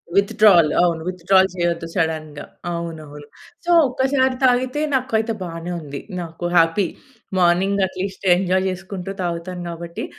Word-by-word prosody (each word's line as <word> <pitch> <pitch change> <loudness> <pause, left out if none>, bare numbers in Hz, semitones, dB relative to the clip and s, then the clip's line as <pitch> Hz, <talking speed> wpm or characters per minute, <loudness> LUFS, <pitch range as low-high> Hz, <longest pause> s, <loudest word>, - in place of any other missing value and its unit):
Withdrawal. 200 -4 +5
అవును 170 -2 +1
withdrawal 185 +1 +3
చేయొద్దు 170 -1 -1
సడెన్‌గా, 155 -4 -2 0.3
అవునవును. 155 -4 -7 0.4
సో, 350 - +1 0.2
ఒక్కసారి 260 0 +1
తాగితే 255 +3 +2
నాకైతే 230 -3 0
బానే 170 0 -5
ఉంది. 145 -2 -7 0.2
నాకు 165 0 -7
హ్యాపీ. 165 +3 +3 0.5
మార్నింగ్ 190 +3 +3
అట్లీస్ట్ 190 +1 -6
ఎంజాయ్ 185 0 +1
చేసుకుంటూ 190 0 -6
తాగుతాను 175 +1 -4
కాబట్టి 170 0 -6
180 Hz, 120 wpm, -21 LUFS, 165-200 Hz, 0.5 s, Withdrawal